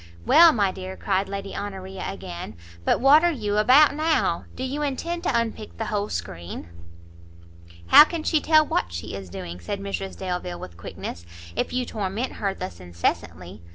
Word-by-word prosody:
"Well, 335 0 +8
my 205 -8 +1
dear," 185 0 -7
cried 190 +1 0
Lady 200 0 -5
Honoria, 190 -1 -6
again, 85 -4 -7 0.3
"but - - +2
what 285 +5 +6
are 345 - +4
you 210 -8 -2
about 265 +7 +6
now? 315 +2 +1
do 255 - -5
you 275 +3 -3
intend 330 +5 -2
to 235 - +2
unpick 225 -2 -5
the 225 - -3
whole 205 0 -1
screen?" 85 -1 -6 1.2
"How - - +11
can 325 -1 -5
she 310 -2 +2
tell 310 -1 +5
what 85 - -1
she 85 0 -6
is 100 -2 -7
doing," 90 -1 -7
said 195 - -4
Mrs 195 -1 -5
Delvile, 180 -1 -4
with 85 - -9
quickness, 85 0 -7 0.3
"if - - -1
you 250 0 -1
torment 215 +3 -3
her 195 -2 0
thus 85 -2 -7
incessantly? 85 +1 -3
200 Hz, 175 wpm, -24 LUFS, -, 1.2 s, How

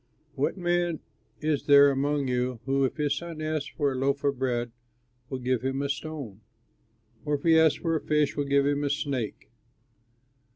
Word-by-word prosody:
"What 140 +8 -1
man 175 -2 0 0.4
is 150 -2 -1
there 140 -1 +7
among 140 +1 0
you, 125 -1 -1
who 135 0 +2
if 130 - -3
his 145 -2 +1
son 170 0 -6
asks 155 -2 -2
him - - -23
for 145 -3 +1
a - - -4
loaf 140 +2 0
of 140 -2 0
bread, 120 -2 -1 0.6
will 130 - -3
give 125 -1 -1
him 135 +2 -2
a 140 - -2
stone? 140 -8 -5 0.8
Or 150 -1 0
if 140 - -6
he 165 -1 +5
asks 160 -2 +4
for 165 -1 0
a 155 - -1
fish, 150 -2 +1
will 145 - -1
give 140 0 +2
him 145 0 +1
a 145 - 0
snake? 140 -6 -3
140 Hz, 195 wpm, -27 LUFS, 135-155 Hz, 0.8 s, there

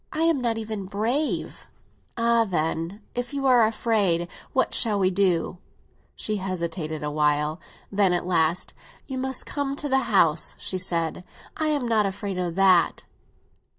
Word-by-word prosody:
"I 315 - -1
am 330 -5 +3
not 230 -2 0
even 215 -3 -5
brave." 230 +10 -2 0.5
"Ah, 230 0 +3
then, 170 +1 -2
if 245 +3 -4
you 275 -1 -2
are 245 -4 +6
afraid, 205 -7 +1 0.2
what 260 - +1
shall 215 -3 +4
we 190 -1 +2
do?" 180 -2 +1 0.6
She 215 -1 -2
hesitated 170 -5 -4
a 150 - -2
while; 150 +1 +1 0.3
then 200 -2 +3
at 175 -1 0
last—"You 180 - -2
must 265 0 -3
come 280 -1 -2
to 290 - -3
the 265 -1 +3
house," 165 -6 +3
she 185 - -3
said; 170 -1 -1 0.3
"I 315 - -1
am 290 -5 0
not 215 -3 +2
afraid 195 -1 -4
of 175 -2 -2
that." 185 -3 +4
200 Hz, 150 wpm, -25 LUFS, 170-235 Hz, 0.6 s, are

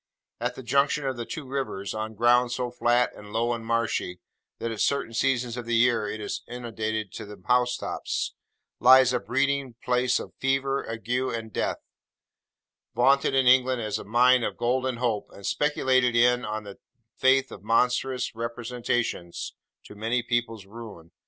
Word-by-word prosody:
At - - -2
the 130 - -9
junction 140 +3 +1
of 135 -1 -1
the 120 -1 -6
two 155 -4 -6
rivers, 130 -7 -4
on 110 0 -4
ground 120 +2 +4
so 125 0 -2
flat 120 0 +2
and 105 0 -12
low 115 +2 0
and 115 -1 -5
marshy, 115 -6 -1 0.4
that 115 - -3
at 110 - -4
certain 140 -5 0
seasons 125 -1 0
of 120 -1 -6
the 120 - +1
year 115 -2 +3
it 110 - -5
is 105 - -4
inundated 110 -4 -4
to - - -7
the 105 0 -11
house 125 0 +2
tops, - - -3 0.5
lies 130 0 +7
a 125 - +1
breeding 135 0 -1
place 125 0 +2
of - - -8
fever, 135 +1 0
ague, 115 0 -7
and 120 -3 -2
death; - - -2 1.1
vaunted 135 +2 +3
in 135 -1 +3
England 130 0 +4
as 105 -1 -2
a - - -7
mine 125 +3 +4
of - - -3
Golden 130 +1 0
Hope, 115 -4 -1
and 100 - -11
speculated 130 -4 +2
in, 125 +1 +4
on 110 +1 -4
the 100 -1 -11 0.4
faith 135 0 +3
of 95 - -9
monstrous 125 +3 +1
representations, 115 -5 -3 0.3
to - - -12
many 115 +4 -1
people's 115 -4 -2
ruin. 100 -6 -11
120 Hz, 170 wpm, -26 LUFS, 115-130 Hz, 1.1 s, lies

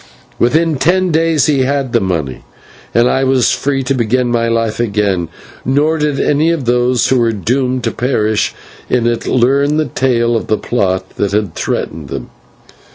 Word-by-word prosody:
Within 155 +5 +2
ten 180 +5 +2
days 160 -1 +2
he 145 -3 +2
had 135 -1 -1
the 120 - +4
money, 80 - -3 0.5
and 120 +1 +3
I 135 - +1
was 130 -3 +2
free 135 -1 -1
to 135 +2 0
begin 125 0 0
my 115 -1 +1
life 115 -1 -1
again, 100 -6 0 0.3
nor 150 +5 +1
did 150 -2 0
any 150 +3 +2
of 165 -6 -1
those 125 +1 +2
who 130 - +3
were 115 -1 +2
doomed 125 +4 -1
to - - 0
perish 110 -4 0 0.3
in 125 -2 +1
it, 120 -1 -1
learn 140 +4 +2
the 155 - +1
tale 120 -4 0
of 115 - -2
the 110 - +1
plot 95 -6 -1
that 100 -1 -1
had 105 -5 0
threatened 75 -2 -3
them. - - -7
125 Hz, 175 wpm, -14 LUFS, 115-140 Hz, 0.5 s, the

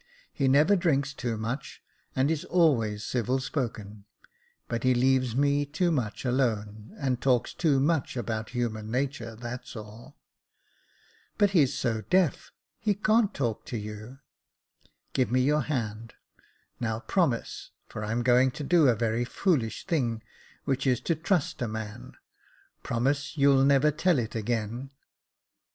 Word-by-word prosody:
He 135 - 0
never 150 +9 +5
drinks 145 -6 +1
too 120 -5 -3
much, 125 +6 -5 0.3
and 135 +4 +2
is 160 -2 -1
always 115 -12 +2
civil 125 +1 0
spoken; 110 -7 -4 0.6
but 115 -1 -2
he 130 0 +3
leaves 130 -1 +2
me 140 +1 +2
too 155 +5 0
much 125 -6 -2
alone, 110 -4 -1
and 130 -3 -1
talks 125 -3 +2
too 150 -6 +2
much 145 -2 0
about 110 -1 -3
human 115 -3 -3
nature, 125 -2 -2
that's 120 +2 -7
all." 110 +6 -11 0.6
'' - - -35
But 205 -2 +3
he's 150 -9 +3
so 115 -3 -1
deaf 185 -4 +2
— - - -61
he 210 -2 +1
can't 215 +1 +2
talk 120 -6 -2
to 120 - -3
you." 105 +4 -8 0.5
*' - - -39
Give 125 -2 +1
me 130 +1 +3
your 150 +3 +2
hand 115 -5 -4 0.3
— - - -39
now 110 -1 -2
promise 140 -7 -1
— - - -47
for 105 - -6
I'm 115 +3 -1
going 125 +1 +4
to 150 - -4
do 160 0 +4
a 120 - +4
very 115 +1 0
foolish 130 - -1
thing, 120 -11 -1 0.4
which 135 -1 -1
is 125 -2 +3
to 165 - 0
trust 160 -2 -1
a 120 - 0
man 110 -1 -7 0.4
— - - -34
promise 140 +6 -1
you'll 140 -1 +5
never 140 +2 +4
tell 165 +2 +2
it 115 -2 -2
again." 115 +3 -3
130 Hz, 160 wpm, -28 LUFS, 115-145 Hz, 0.6 s, never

